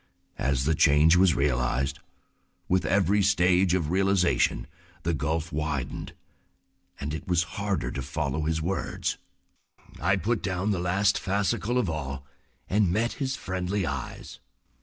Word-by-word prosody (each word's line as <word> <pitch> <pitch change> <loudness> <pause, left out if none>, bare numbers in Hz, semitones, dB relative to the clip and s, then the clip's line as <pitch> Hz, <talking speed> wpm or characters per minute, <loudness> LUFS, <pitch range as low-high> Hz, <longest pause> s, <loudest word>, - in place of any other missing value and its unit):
As 65 -1 0
the 80 - +3
change 75 +2 +5
was 90 -3 +4
realized, 65 -1 0 0.7
with 95 0 +1
every 100 +1 +3
stage 90 -2 +3
of 85 -4 -1
realization 95 -8 +2 0.4
the 85 - 0
gulf 80 +2 -2
widened 75 -3 -3 0.9
and 70 +1 -4
it 80 - -6
was 90 -2 +2 0.2
harder 100 -12 -1
to 65 - -4
follow 70 +2 -2
his 80 0 -1
words. 95 +3 -2 0.8
I 95 - +3
put 110 +6 -1
down 95 +2 -1
the 95 - 0
last 95 +3 +2
fascicle 100 +4 0
of 125 -6 +1
all, 70 -4 -4 0.4
and 100 -3 +2
met 115 +5 0
his 130 -1 -1
friendly 95 -2 -2
eyes. 70 -5 -6
90 Hz, 140 wpm, -27 LUFS, 75-95 Hz, 0.9 s, change